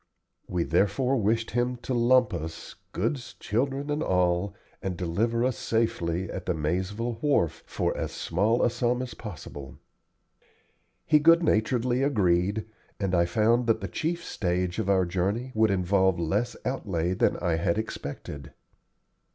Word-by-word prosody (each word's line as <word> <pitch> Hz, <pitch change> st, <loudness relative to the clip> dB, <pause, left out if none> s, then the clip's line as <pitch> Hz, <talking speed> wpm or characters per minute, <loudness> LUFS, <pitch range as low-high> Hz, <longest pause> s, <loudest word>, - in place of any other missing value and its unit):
We 90 Hz, -2 st, 0 dB
therefore 105 Hz, -, +2 dB
wished 115 Hz, +1 st, 0 dB
him 120 Hz, +2 st, 0 dB
to 130 Hz, -, -2 dB
"lump" 125 Hz, -1 st, +4 dB
us, 80 Hz, 0 st, -6 dB, 0.2 s
goods, 120 Hz, -, -2 dB
children, 135 Hz, +6 st, -1 dB
and 150 Hz, +1 st, -1 dB
all, 90 Hz, -, +1 dB, 0.3 s
and 95 Hz, -2 st, -3 dB
deliver 110 Hz, +8 st, 0 dB
us 130 Hz, -2 st, 0 dB
safely 95 Hz, -6 st, 0 dB
at 90 Hz, +1 st, -6 dB
the 90 Hz, -, +1 dB
Maizeville 95 Hz, +9 st, -2 dB
wharf 135 Hz, -, +1 dB
for -, -, -1 dB
as -, -, -3 dB
small 105 Hz, +8 st, +1 dB
a 120 Hz, -, +3 dB
sum 120 Hz, +1 st, 0 dB
as 125 Hz, -3 st, -7 dB
possible. 75 Hz, -, -9 dB, 1.3 s
He 150 Hz, -, +5 dB
good 165 Hz, +3 st, +6 dB
naturedly 120 Hz, 0 st, +1 dB
agreed, 100 Hz, -5 st, +2 dB, 0.3 s
and 95 Hz, -2 st, -1 dB
I 85 Hz, -1 st, +4 dB
found 115 Hz, +6 st, +2 dB
that 115 Hz, -1 st, +3 dB
the 100 Hz, -, -4 dB
chief 170 Hz, -, -2 dB
stage 90 Hz, -1 st, -1 dB
of 100 Hz, -, -1 dB
our 95 Hz, -2 st, +4 dB
journey 100 Hz, +8 st, -1 dB
would 110 Hz, 0 st, +3 dB
involve 95 Hz, -1 st, +2 dB
less 100 Hz, +9 st, 0 dB
outlay 95 Hz, -9 st, -1 dB
than -, -, +2 dB
I 85 Hz, -2 st, 0 dB
had 85 Hz, +2 st, 0 dB
expected. 75 Hz, -8 st, -6 dB
105 Hz, 150 wpm, -27 LUFS, 90-120 Hz, 1.3 s, good